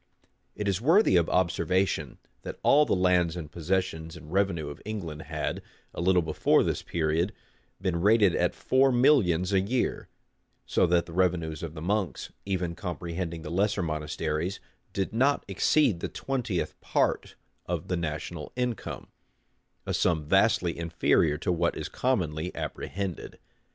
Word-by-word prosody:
[] - - -45
It 105 - -3
is 100 0 0
worthy 165 - +5
of 85 -2 +3
observation, 90 +1 0 0.2
that - - -7
all 150 +1 +5
the - - +2
lands 90 -2 +2
and 80 -4 -7
possessions 85 -1 -2
and 75 +1 -11
revenue 95 -6 +1
of 75 - -9
England 85 -8 -5
had, - - -3 0.3
a - - -4
little 90 0 +3
before 80 -1 +3
this - - -1
period, 80 +3 0 0.5
been 90 -3 -1
rated 105 -2 +4
at - - +1
four 135 +1 +3
millions 100 - +3
a 95 - +5
year; 120 +6 -1 0.6
so - - +2
that 85 0 +2
the 85 - -11
revenues 85 -4 0
of 80 -1 -6
the 80 - -7
monks, 100 0 -2
even 90 -3 -1
comprehending 85 -3 -5
the 75 - -6
lesser 100 +1 +1
monasteries, 75 +2 -2 0.3
did 95 +2 -2
not 135 +5 +2
exceed 100 - +2
the - - -3
twentieth 120 -9 -3
part - - 0 0.3
of - - -3
the 90 - 0
national 80 -1 -4
income; 125 -2 -3 0.8
a - - -2
sum 80 -4 +1
vastly 95 0 +3
inferior 85 -2 +2
to 90 - -1
what 85 -1 0
is - - -4
commonly 90 -10 -1
apprehended. 95 -3 -5
90 Hz, 150 wpm, -28 LUFS, 85-100 Hz, 0.8 s, worthy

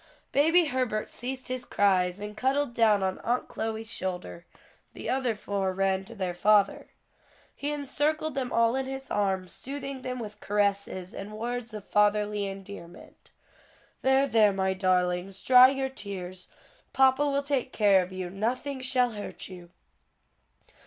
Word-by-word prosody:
Baby 325 +5 +4
Herbert 255 -6 -1
ceased 255 +2 -5
his 255 -1 -3
cries 185 -4 +2
and 210 +1 -6
cuddled 265 +2 0
down 215 -4 +3
on 190 0 -1
Aunt 245 +2 -1
Chloe's 225 0 -4
shoulder; 180 -2 -5 0.5
the - - -7
other 255 -4 0
four 195 -2 -2
ran 190 0 0
to 230 +3 -11
their 185 -4 -2
father. 200 +2 +3 0.7
He 290 +1 -2
encircled 295 +2 -1
them 260 -2 -2
all 230 +1 +3
in 265 0 -1
his 270 0 -6
arms, 190 -3 0
soothing 275 0 -6
them 255 0 -4
with 210 -3 -7
caresses 200 -3 -1
and 210 +2 -7
words 240 0 -4
of 210 -2 -8
fatherly 210 0 +2
endearment. 195 -3 -10 0.7
"There, 265 +1 +4
there, 220 -6 +4
my 190 -1 0
darlings, 185 0 0
dry 255 0 +8
your 270 0 -1
tears; 185 -7 -7 0.5
papa 265 +1 +4
will 280 0 0
take 275 -2 -1
care 200 -3 +4
of 180 +1 -6
you; 185 -1 -5
nothing 255 +7 -2
shall 255 -1 +2
hurt 205 -2 -7
you." 175 -2 -11
215 Hz, 150 wpm, -28 LUFS, 195-260 Hz, 0.7 s, dry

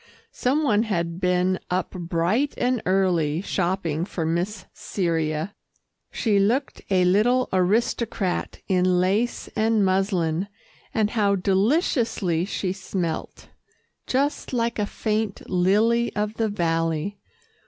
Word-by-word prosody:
Some 280 +5 0
one 215 -7 +3
had 170 -6 -2
been 180 0 +2
up 180 0 -1
bright 180 +10 0
and 245 -2 +1
early, 175 -5 +2
shopping 175 -4 -1
for 175 -3 -3
Miss 180 +4 -2
Cyria. 165 -1 -2 0.6
She 210 -4 +1
looked 240 +8 0
a 185 -2 +3
little 235 +8 +3
aristocrat 200 +1 0
in 180 -1 +3
lace 200 +7 0
and 220 -2 +2
muslin, 185 -2 +1 0.4
and 215 -1 +1
how 205 -3 +2
deliciously 195 - +1
she 190 -2 -2
smelt 185 -4 -4 0.6
just 275 +1 -1
like 235 -2 0
a 205 - 0
faint 215 -2 -2
lily 215 +6 +2
of 210 0 -1
the 220 -1 -1
valley. 165 0 -1
195 Hz, 115 wpm, -24 LUFS, 180-220 Hz, 0.6 s, one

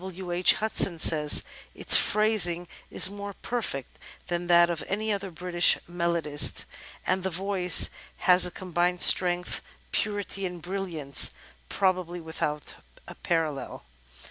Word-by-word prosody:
W. 185 -1 -9
H. 175 +1 +3
Hudson 210 -5 0
says: 150 -2 +2 0.3
"Its - - +6
phrasing 195 -5 +3 0.2
is - - +5
more 200 0 -9
perfect 200 - -7 0.3
than 175 0 -4
that 175 0 +4
of 165 - -5
any 215 +2 -3
other 195 -1 -6
British 175 0 +1
melodist, 170 -4 0 0.4
and 185 +1 -1
the 190 - -4
voice 185 0 +2 0.3
has 180 0 +3
a - - -6
combined 180 0 -3
strength, 180 -1 +4 0.3
purity 205 -1 -4
and 180 -1 -10
brilliance, 170 -6 0 0.3
probably 185 -2 -2
without 155 -3 -6 0.3
a - - -10
parallel." 160 -5 -5
180 Hz, 125 wpm, -25 LUFS, 170-190 Hz, 0.4 s, Its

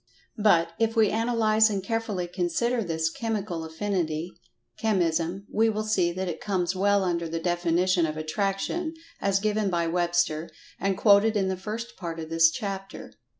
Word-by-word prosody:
But, 170 -6 +4
if 225 0 +1
we 220 -3 +4
analyze 220 -1 +3
and 200 -2 -2
carefully 220 -4 -2
consider 190 +7 -1
this 160 -3 -1
"Chemical 200 -3 -3
Affinity," 165 -1 -2 0.5
"Chemism," 180 -2 0
we 225 +1 +3
will 215 0 -1
see 190 -5 +1
that 185 +2 -3
it 165 -2 -5
comes 185 -2 -1
well 200 +1 +3
under 170 -2 -1
the 165 - -3
definition 175 0 +1
of 155 0 -5
"Attraction" 195 - -2 0.3
as 195 -1 +2
given 210 0 0
by 170 -2 0
Webster, 175 -1 0 0.3
and 195 0 0
quoted 210 +1 +5
in 190 -2 +1
the 190 - -1
first 220 +5 -6
part 165 -3 -5
of 160 0 -7
this 165 0 +6
chapter. 195 -1 -6
190 Hz, 160 wpm, -26 LUFS, 170-215 Hz, 0.5 s, this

